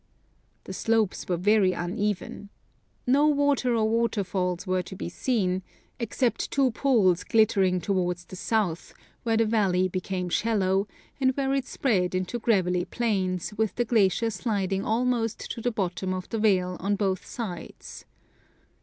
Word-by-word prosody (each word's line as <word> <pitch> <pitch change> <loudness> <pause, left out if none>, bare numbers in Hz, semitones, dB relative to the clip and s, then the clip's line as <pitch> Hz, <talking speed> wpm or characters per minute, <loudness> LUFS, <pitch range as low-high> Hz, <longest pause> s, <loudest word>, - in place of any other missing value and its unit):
The - - -7
slopes 225 -3 0
were 175 - +1
very 195 0 +3
uneven. 200 +2 -3 0.6
No 280 +4 +4
water 285 -4 +2
or 220 -1 +2
waterfalls 200 -5 0
were 185 -1 +1
to 180 +2 -9
be 180 - -5
seen, 190 -3 0 0.4
except 235 +1 -1
two 270 -2 +2
pools 220 -9 +2
glitter 220 -2 +3
ing 185 -1 +2
towards 180 -3 -1
the 185 - -10
south, 185 -4 -1 0.3
where 225 -2 +1
the 225 - +3
valley 195 -4 +2
became 185 0 -3
shallow, 195 0 +1 0.3
and 260 -1 +2
where 270 -1 +1
it 270 -1 -1
spread 185 -9 0
into 185 +6 -2
gravelly 180 -6 +1
plains, 195 -5 -1
with 220 0 -1
the 240 - 0
glacier 225 0 +2
sliding 195 -4 -1
almost 230 -1 0
to 230 - -5
the 245 - +1
bottom 185 -3 -2
of 185 -1 -6
the 225 - -2
vale 185 -4 +2
on 200 +3 0
both 195 -2 -1
sides. 195 -8 -7
205 Hz, 150 wpm, -26 LUFS, 185-230 Hz, 0.6 s, No